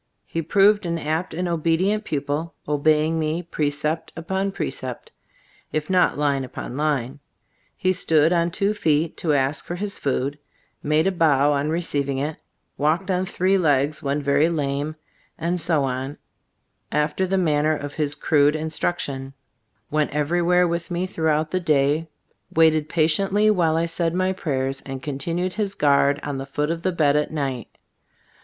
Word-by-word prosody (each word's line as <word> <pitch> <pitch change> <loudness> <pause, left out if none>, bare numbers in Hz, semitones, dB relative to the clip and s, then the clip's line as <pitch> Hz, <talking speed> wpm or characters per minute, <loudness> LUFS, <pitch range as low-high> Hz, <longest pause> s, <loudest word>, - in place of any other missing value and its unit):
He 165 - -3
proved 200 +4 +3
an 170 0 -1
apt 160 +3 -2
and 180 +3 -2
obedient 170 +6 +1
pupil, 150 +3 -3
obeying 155 +2 +2
me 160 +2 -1
precept 155 0 -2
upon 190 +4 -2
precept, 130 -9 -5 0.6
if 155 +2 -2
not 180 -5 +3
line 140 -2 +1
upon 125 -1 -7
line. 145 -3 -1 0.6
He 185 0 +2
stood 160 -2 +3
on 170 0 +2
two 200 +4 0
feet 160 -5 +1
to 155 -3 0
ask 140 +2 0
for 175 - -5
his 200 +2 -4
food, 140 +1 -1 0.4
and - - -6
made 155 +1 +3
a 195 - +3
bow 150 -5 +3
on 145 +1 0
receiving 145 -5 -1
it, 150 +3 -2 0.4
walked 165 +7 +1
on 185 +1 0
three 190 +1 +1
legs 145 -3 +1
when 140 +1 -1
very 140 +3 +3
lame, 145 -1 -2 0.4
and 170 +2 -1
so 155 -3 +1
on, 135 +2 -3 0.7
after 150 +5 0
the 195 +1 +1
manner 155 -3 +2
of 145 0 -6
his 150 -2 -1
crude 145 0 +3
instruction; 150 -4 -3 0.6
went 150 0 +1
everywhere 175 +4 +2
with 170 0 -3
me 175 +1 -1
through 160 -4 0
the 185 - +1
day, 150 -1 +1 0.4
waited 155 -1 +3
patiently 195 +6 +3
while 165 -5 +2
I 165 - +1
said 165 0 -1
my 185 +1 +1
prayers 135 -6 -2
and 135 -1 -7
continued 165 +6 -2
his 205 -1 -2
guard 140 -1 +3
on 145 -2 -3
the 135 - -6
foot 150 +2 -1
of 165 0 -3
the 185 - 0
bed 150 -4 +2
at 150 0 +1
night. 135 -5 -4
155 Hz, 160 wpm, -23 LUFS, 145-175 Hz, 0.7 s, proved